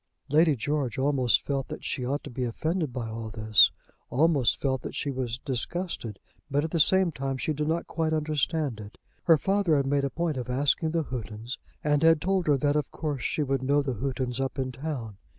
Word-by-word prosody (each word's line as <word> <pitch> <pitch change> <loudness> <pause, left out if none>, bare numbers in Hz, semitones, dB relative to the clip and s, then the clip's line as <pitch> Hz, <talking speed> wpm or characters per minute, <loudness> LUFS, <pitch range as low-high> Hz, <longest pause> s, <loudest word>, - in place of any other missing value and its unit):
Lady 155 +1 +4
George 135 -1 -2
almost 130 -3 +2
felt 135 -2 -1
that - - -7
she 125 - -2
ought 140 +4 -2
to 145 - -8
be 125 +1 -3
offended 155 +6 -1
by 120 -2 -4
all 110 0 -5
this, 110 -1 +5 0.4
almost 140 -4 +3
felt 130 -2 0
that - - -7
she 140 - -2
was 125 -3 -3
disgusted; 130 - -3 0.3
but, 145 +1 +1
at 160 - -3
the 170 - 0
same 190 +3 +4
time, 135 -2 -3
she 155 - -1
did 150 +1 -2
not 165 +2 0
quite 160 -1 -1
understand 155 -4 0
it. 105 -1 -10 0.3
Her 165 -2 +6
father 195 -1 +2
had 140 - +1
made 140 0 +1
a 140 - 0
point 165 -1 -2
of 125 -1 -4
asking 140 +5 +2
the 165 0 0
Houghtons, 115 -2 -6 0.2
and 145 -1 +2
had 165 -1 +5
told 190 +1 0
her 145 -2 +4
that 145 +2 +1
of 150 -2 0
course 145 -5 -3
she 150 - 0
would 135 -1 0
know 140 +2 +2
the 135 -2 -2
Houghtons 130 -1 -2
up 135 -1 -3
in 130 -1 -2
town. 125 -6 -5
140 Hz, 215 wpm, -27 LUFS, 125-155 Hz, 0.4 s, Her